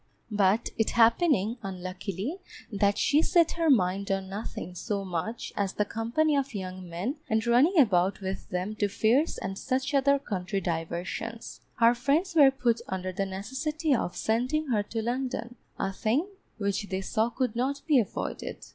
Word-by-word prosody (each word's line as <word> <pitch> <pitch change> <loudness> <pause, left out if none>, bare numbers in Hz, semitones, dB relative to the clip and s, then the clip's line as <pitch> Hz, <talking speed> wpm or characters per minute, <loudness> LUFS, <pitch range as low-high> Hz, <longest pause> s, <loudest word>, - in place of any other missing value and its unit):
But 205 +2 +2
it 220 - +2
happening, 230 - +3
unluckily, 190 - -5 0.3
that 200 -1 +2
she 295 +2 +3
set 335 0 +3
her 330 -1 +1
mind 195 -5 +2
on 195 -1 -1
nothing 195 -3 -6
so 200 +2 -3
much 185 +6 -4
as 195 -2 -1
the 210 - 0
company 235 +9 0
of 275 -4 -1
young 185 -2 -6
men 190 - -3
and 220 +1 +1
running 260 +11 +4
about 190 - +4
with 190 -1 -5
them 185 +4 -3
to 205 - +2
fairs 225 +9 +2
and 195 +1 -5
such 265 +2 -1
other 280 0 +4
country 195 -6 -3
diversions, 175 +6 -4
her 230 +1 +5
friends 285 +10 +1
were 290 -4 +7
put 245 -3 0
under 185 0 -3
the 195 +1 -2
necessity 275 - -2
of 200 -8 -1
sending 255 +7 0
her 215 -4 +2
to 220 +2 -4
London, 245 0 -3 0.2
a 195 - -2
thing 245 - 0 0.3
which 200 -1 -2
they 190 0 -2
saw 220 +4 0
could 245 -2 -2
not 275 +4 -1
be 300 -5 +5
avoided. 220 - -4
220 Hz, 165 wpm, -28 LUFS, 195-265 Hz, 0.3 s, were